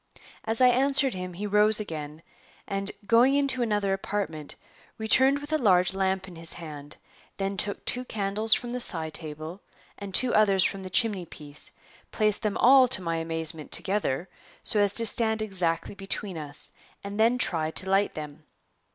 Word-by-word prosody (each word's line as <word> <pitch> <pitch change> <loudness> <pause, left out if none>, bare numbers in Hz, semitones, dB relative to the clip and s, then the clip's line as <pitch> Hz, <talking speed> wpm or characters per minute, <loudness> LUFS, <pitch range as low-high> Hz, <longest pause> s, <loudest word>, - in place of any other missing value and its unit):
As 225 +2 -1
I 250 - +6
answered 270 +1 +2
him 180 -1 -7
he 195 +4 -6
rose 210 +1 +4
again, 155 -5 -7 0.4
and, 195 0 -4
going 240 +5 +4
into 275 -3 0
another 205 -4 0
apartment, 195 -6 -5 0.4
returned 260 +5 +3
with 290 +2 -8
a 310 - +1
large 185 -5 +3
lamp 190 0 -2
in 180 - -12
his 165 0 -6
hand; 150 -3 -10 0.4
then 195 0 -3
took 200 +2 -4
two 250 - 0
candles 215 0 +2
from 240 - -6
the 250 - -4
side 160 -9 0
table, 155 +4 -7 0.4
and 200 -1 -8
two 245 +6 +4
others 195 -3 +4
from 195 +1 -2
the 185 - -8
chimney 195 -3 0
piece; 145 -1 -6 0.4
placed 215 -2 0
them 215 -3 -2
all, 260 +1 +6
to 225 -7 +1
my 165 -1 -2
amazement, 160 -1 +4
together, 190 -6 +2 0.4
so 210 - 0
as 205 -1 +1
to 230 - +7
stand 220 0 0
exactly 180 -6 -2
between 195 -1 -4
us, 150 -2 -3 0.3
and 200 +1 -7
then 230 +3 +3
tried 160 -9 -2
to 190 - -1
light 195 +1 +1
them. 150 0 -8
195 Hz, 175 wpm, -26 LUFS, 165-220 Hz, 0.4 s, to